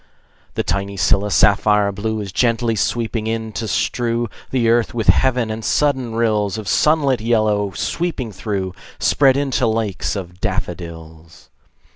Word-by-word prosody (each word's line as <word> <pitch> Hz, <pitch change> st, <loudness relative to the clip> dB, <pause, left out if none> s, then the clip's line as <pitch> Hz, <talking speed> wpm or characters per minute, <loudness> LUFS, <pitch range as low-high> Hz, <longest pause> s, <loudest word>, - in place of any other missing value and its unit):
The -, -, 0 dB
tiny 100 Hz, 0 st, -2 dB
scilla, 100 Hz, +3 st, +2 dB
sapphire 105 Hz, +1 st, +3 dB
blue, 110 Hz, +2 st, -3 dB
Is 100 Hz, -2 st, -6 dB
gently 115 Hz, +1 st, +1 dB
sweeping 115 Hz, +1 st, -1 dB
in, 110 Hz, 0 st, -3 dB
to 110 Hz, -, -3 dB
strew 115 Hz, +5 st, -1 dB, 0.2 s
The 125 Hz, -3 st, +1 dB
earth 120 Hz, 0 st, +2 dB
with 115 Hz, -3 st, 0 dB
heaven; 125 Hz, -4 st, +3 dB
and 110 Hz, +1 st, -5 dB
sudden 130 Hz, -5 st, 0 dB
rills 110 Hz, -3 st, +1 dB
Of 110 Hz, -2 st, -6 dB
sunlit 140 Hz, -, +2 dB
yellow, 110 Hz, -3 st, +1 dB
sweeping 160 Hz, -, -3 dB
through, 95 Hz, -2 st, -3 dB, 0.2 s
Spread 135 Hz, -2 st, +3 dB
into 135 Hz, -3 st, +1 dB
lakes 110 Hz, -4 st, -1 dB
of 90 Hz, -2 st, -7 dB
daffodils. 85 Hz, -4 st, -6 dB
110 Hz, 140 wpm, -19 LUFS, 100-120 Hz, 0.2 s, sapphire